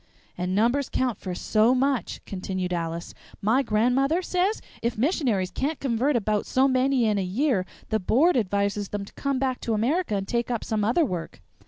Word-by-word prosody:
"And 180 +1 -2
numbers 240 +6 +2
count 250 -3 -1
for 185 -2 -5
so 220 +6 +3
much," 270 -1 -1
continued 185 -1 -3
Alice. 170 0 -3 0.3
"My 225 +7 +3
grandmother 265 +9 +2
says 370 +5 0 0.2
if 235 -1 -1
missionaries 235 - +1
can't 290 - -2
convert 265 +2 +1
about 215 -2 0
so 265 +1 +3
many 260 -1 +2
in 210 -2 +2
a - - 0
year 200 0 0 0.2
the 220 - +1
Board 285 - +3
advises 200 -2 0
them 205 -1 -4
to - - -15
come 280 -1 -1
back 260 -1 -1
to 225 - -1
America 255 - 0
and 195 -1 -2
take 235 +1 -1
up 235 -3 -2
some 215 -2 -1
other 245 +10 +3
work." 175 - -5
230 Hz, 185 wpm, -25 LUFS, 200-270 Hz, 0.3 s, so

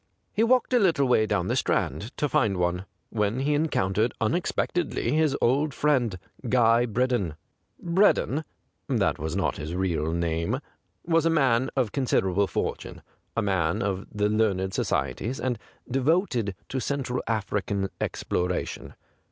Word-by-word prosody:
He 215 - +1
walked 250 +2 +3
a 245 - +5
little 165 - +3
way 110 -3 +3
down - - 0
the - - 0
Strand 110 +5 -1
to 150 - +1
find 110 -7 +1
one, 90 +1 0 0.3
when 105 +3 0
he 145 +2 +1
encountered 115 -8 +1
unex 115 +11 0
pectedly 175 -4 -1
his 155 -3 +2
old 140 +4 +2
friend, 125 -10 +1 0.3
Guy 120 0 +4
Bred 125 +4 0
don. 95 -11 0 0.5
Breddon 170 -5 +3 0.5
(that - - +1
was 80 +3 -3
not 95 - 0
his 75 +3 -5
real 85 -4 0
name) 85 +7 -1 0.5
was 165 -1 +3
a - - +4
man 130 -5 +3
of 125 -6 +1
considerable 100 -7 +1
fortune, - - -4 0.3
a 115 - +2
member 95 -2 0
of 95 -1 -2
the 105 -1 +1
learned 100 -3 +1
societies, 125 +6 -1
and 125 -4 -1 0.3
devoted 130 - +1
to 130 - -2
Central 130 -2 -2
African 100 -2 -1
exploration. 90 0 -2
115 Hz, 145 wpm, -26 LUFS, 95-140 Hz, 0.5 s, a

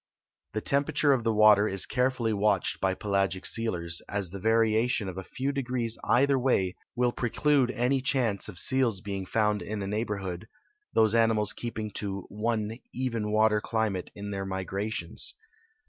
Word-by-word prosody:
The 110 - -2
temperature 145 +2 +2
of 125 -3 0
the 115 - +2
water 105 -1 +6
is 95 -2 +2
carefully 125 -3 0
watched 105 +1 +1
b}'' 95 -1 0
pelagic 100 -2 0
sealers, 85 -7 0
as 100 -4 -2
the 100 - -6
variation 110 +1 +2
of 95 - -5
a 95 - -5
few 135 +8 -3
degrees 125 -4 -1
either 135 +1 +3
way 95 -8 +1 0.2
will 125 0 +2
pre 120 0 -2
clude 145 -1 +2
any 125 +2 +1
chance 120 -7 0
of 95 - -9
seals 125 -2 +2
being 95 -1 -5
found 105 0 +1
in 105 -1 -4
a - - -4
neighborhood, 105 -2 -3 0.5
tlu)se 110 -1 +4
animals 110 -3 +3
kee[)ing 110 -3 -5
to 100 -1 -3
one 110 +1 -2
even 115 -5 -2
water 110 0 +3
climate 110 -6 -2
in 100 0 -6
their 95 -1 -3
migrations. 100 - -3
110 Hz, 160 wpm, -28 LUFS, 100-120 Hz, 0.5 s, water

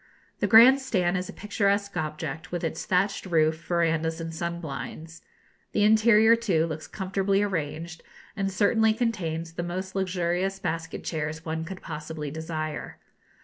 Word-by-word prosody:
The - - +1
grand 245 +5 +8
stand 185 -9 0
is 180 0 -2
a - - -7
picturesque 200 -1 0
object, 160 +1 -4
with 175 -1 -3
its 160 0 -3
thatched 190 +1 +1
roof, 160 -1 +2
verandahs, 165 -1 +1
and 165 0 -5
sun 170 +1 -3
blinds. 160 +2 -7 0.5
The 210 - +2
interior, 220 +1 +6
too, 190 -9 +1
looks 155 -1 -5
comfortably 195 +1 0
arranged, 165 -3 -3 0.3
and 195 -2 -1
certainly 220 +3 +3
contains 170 -9 -2
the 170 - -3
most 185 +2 -4
luxurious 185 0 -1
basket 165 -3 -4
chairs 155 0 -4
one 160 0 -3
could 185 +2 -8
possibly 150 -1 -6
desire. 155 -1 -5
175 Hz, 145 wpm, -26 LUFS, 160-200 Hz, 0.5 s, grand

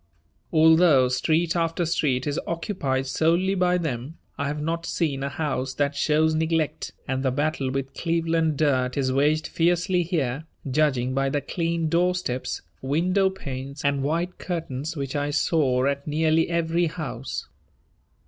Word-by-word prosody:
Although 160 -5 +5
street 160 +7 +1
after 165 0 0
street 140 -6 0
is 145 0 -1
occupied 155 -6 -1
solely 170 +7 +2
by 180 -1 +2
them, 150 -2 -4 0.2
I 140 - -2
have 150 +1 -3
not 165 +2 -2
seen 145 -6 -1
a 140 - -1
house 135 -3 -2
that 145 0 0
shows 155 +2 +2
neglect, 160 -1 -1 0.2
and 130 0 -1
the 135 - +1
battle 145 0 -1
with 135 0 -3
Cleveland 165 -2 0
dirt 130 -4 +1
is 130 -2 +1
waged 150 +3 +2
fiercely 175 +2 +1
here, 155 -5 -1 0.2
judging 130 -3 +1
by 135 0 +1
the 145 - 0
clean 165 +1 -1
doorsteps, 175 -6 0 0.2
window 180 +8 +2
panes, 140 -6 -7
and 140 -1 +2
white 165 +6 -1
curtains 160 -3 -4
which 140 0 -4
I 145 0 0
saw 145 -4 +2
at 140 +1 -1
nearly 160 +2 +2
every 170 0 +1
house. 135 -5 -5
155 Hz, 150 wpm, -25 LUFS, 135-165 Hz, 0.2 s, Although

